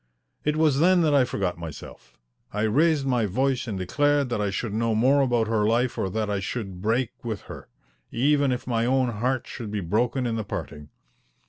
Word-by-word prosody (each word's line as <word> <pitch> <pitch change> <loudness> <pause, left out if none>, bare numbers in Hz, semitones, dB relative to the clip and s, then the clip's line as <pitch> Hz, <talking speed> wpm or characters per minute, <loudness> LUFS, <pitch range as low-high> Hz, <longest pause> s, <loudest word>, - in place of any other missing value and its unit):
It 150 0 +1
was 155 -4 +3
then 180 +2 +5
that 155 -3 +2
I 135 -3 +5
forgot 95 -8 -2
myself. 75 -6 -10 0.3
I 105 +1 -2
raised 145 +6 +2
my 125 -5 +1
voice 130 +5 0
and 105 -4 -3
declared 145 +8 +1
that 120 - -1
I 105 - 0
should 100 +2 -3
know 115 0 0
more 130 +6 +4
about 120 -4 +1
her 110 -1 +1
life 120 +2 +1
or 95 - -2
that 110 +3 -2
I 100 -1 -1
should 95 -2 -5
break 115 +3 0
with 110 -4 -4
her, - - -11 0.4
even 140 +2 +2
if 125 - -3
my 115 -2 0
own 130 -1 +2
heart 120 +3 -1
should 115 -4 -7
be 105 0 -2
broken 120 +8 0
in 115 -1 -1
the 110 - -2
parting. 75 -6 -7
120 Hz, 205 wpm, -25 LUFS, 105-135 Hz, 0.4 s, then